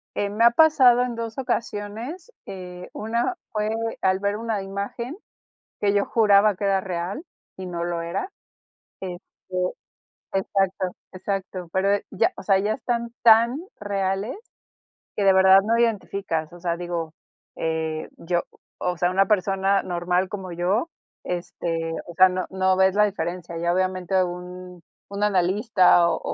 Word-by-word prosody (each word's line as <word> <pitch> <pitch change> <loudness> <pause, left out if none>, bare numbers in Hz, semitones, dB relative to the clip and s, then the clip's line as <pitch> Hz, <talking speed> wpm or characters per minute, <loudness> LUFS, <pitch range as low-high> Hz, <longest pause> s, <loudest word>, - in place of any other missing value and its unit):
Eh, 205 - 0
me 215 +3 +2
ha 235 - +8
pasado 260 -4 +6
en 245 -1 -3
dos 230 +1 -5
ocasiones, 240 - -4
eh, 180 -1 -8
una 235 - -1 0.2
fue 210 0 -1 0.3
al 190 0 +2
ver 200 +1 -1
una 225 -2 -2
imagen 200 +7 -5 0.6
que 200 -1 +2
yo 200 0 +2
juraba 210 -2 +4
que 200 - -3
era 195 -1 +2
real 185 - -4 0.3
y 190 - -6
no 175 -1 -4
lo 170 -1 -2
era. 180 - -4 0.7
Este 180 -2 -6 1.1
exacto, 195 -1 0 0.2
exacto. 185 -2 -4
Pero 190 +1 +2
eh, 205 - -1
ya, - - +2
o - - -8
sea, 195 0 +4
ya 210 +2 0
están 235 -1 -2
tan 230 +3 +6 0.2
reales 200 - -2 0.8
que 205 - 0
de 195 -1 +6
verdad 190 0 +7
no 225 +3 +2
identificas. 195 -8 -1
O 175 - -11
sea, 170 -1 -1
digo, 170 -2 -4 0.4
eh, 160 -1 -2
yo, 175 +1 -1 0.3
o 180 0 -1
sea, 175 +2 +1
una 195 +1 +3
persona 195 -1 +2
normal 180 +1 0
como 190 -2 -6
yo, 190 - 0 0.4
este, 165 -2 -3
o 175 - -9
sea, 185 +2 +7
no 185 0 -2
no 190 0 +1
ves 190 0 +4
la 210 - +5
diferencia. 175 -3 -4
Ya, 170 +1 0
obviamente, 185 0 +1
un 180 0 -7 0.3
un 200 +1 -2
analista 190 -1 +4
o - - 0
190 Hz, 155 wpm, -24 LUFS, 180-210 Hz, 1.1 s, ha